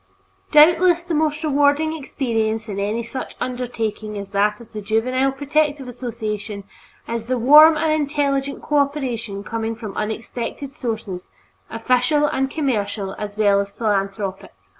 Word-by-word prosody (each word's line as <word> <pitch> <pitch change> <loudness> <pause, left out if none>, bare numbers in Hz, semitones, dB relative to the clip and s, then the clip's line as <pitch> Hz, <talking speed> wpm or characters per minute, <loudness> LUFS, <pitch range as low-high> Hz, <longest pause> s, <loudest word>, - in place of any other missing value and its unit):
Doubtless 345 +3 +6
the 345 -1 -4
most 305 0 0
rewarding 290 +1 +2
experience 225 -7 -2
in 200 -2 -4
any 210 +4 -1
such 255 +3 -6
undertaking 225 -4 -3
as 200 -1 -7
that 210 +1 +1
of 235 -2 -15
the 210 - -5
Juvenile 255 +6 +1
Protective 285 0 0
Association 215 -4 -5 0.4
is 230 -1 -4
the 255 0 0
warm 300 +6 +8
and 315 0 +1
intelligent 285 -2 -1
cooperation 265 -8 -1
coming 225 +2 -3
from 220 -3 -8
unexpected 230 +5 -4
sources 220 -9 -5 0.4
official 250 +6 +2
and 270 -2 0
commercial 210 -9 -2
as 210 -1 -6
well 205 -2 +4
as 200 0 -3
philanthropic. 195 -2 -2
240 Hz, 135 wpm, -21 LUFS, 215-285 Hz, 0.4 s, warm